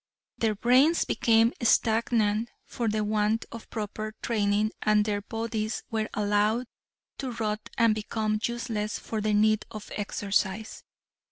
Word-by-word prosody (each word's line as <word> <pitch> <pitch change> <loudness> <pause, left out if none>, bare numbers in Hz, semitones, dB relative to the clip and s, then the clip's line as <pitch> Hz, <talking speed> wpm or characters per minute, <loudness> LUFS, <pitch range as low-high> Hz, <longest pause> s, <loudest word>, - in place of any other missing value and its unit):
Their 220 -2 +1
brains 255 +10 +4
became 225 +1 +3
stagnant 225 -1 +2 0.2
for 235 - -3
the 215 0 0
want 210 +1 +1
of 230 - -9
proper 215 0 -5
training 210 -1 +1
and 210 0 +3
their 205 -1 -1
bodies 225 0 -3
were 220 -1 -1
allowed 210 +3 +1 0.5
to 260 -3 -3
rot 215 -2 -3
and 230 -2 +5
become 215 0 -1
useless 230 -3 -2
for 220 -1 -4
the 210 0 +1
need 215 +1 +3
of 215 -2 -9
exercise. 205 0 -2
215 Hz, 135 wpm, -27 LUFS, 210-230 Hz, 0.5 s, and